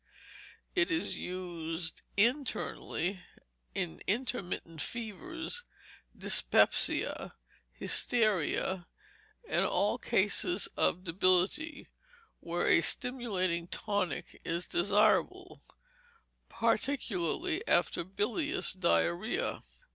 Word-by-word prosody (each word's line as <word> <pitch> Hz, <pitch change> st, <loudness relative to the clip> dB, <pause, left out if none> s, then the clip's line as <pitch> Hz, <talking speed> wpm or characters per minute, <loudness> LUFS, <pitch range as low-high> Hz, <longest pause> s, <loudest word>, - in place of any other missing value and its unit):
It 370 Hz, -1 st, +2 dB
is 335 Hz, -2 st, -1 dB
used 170 Hz, -2 st, -4 dB, 0.2 s
internally 205 Hz, -, 0 dB, 0.5 s
in 80 Hz, -, -3 dB
intermittent 195 Hz, -, -1 dB
fevers, 330 Hz, -, -4 dB, 0.5 s
dyspepsia, -, -, +2 dB, 0.4 s
hysteria, 190 Hz, -5 st, +1 dB, 0.6 s
and -, -, +2 dB
all -, -, +1 dB
cases -, -, +2 dB
of 180 Hz, -, +2 dB
debility, 185 Hz, -, +2 dB, 0.5 s
where 170 Hz, +1 st, -2 dB
a -, -, +6 dB
stimulating 185 Hz, -6 st, 0 dB
tonic 205 Hz, -1 st, -2 dB
is 170 Hz, +2 st, -2 dB
desirable, 205 Hz, +4 st, +2 dB, 0.9 s
particularly 285 Hz, -, 0 dB
after -, -, +2 dB
bilious 215 Hz, -, -1 dB
diarrhoea. 185 Hz, +2 st, 0 dB
195 Hz, 70 wpm, -32 LUFS, 175-250 Hz, 0.9 s, a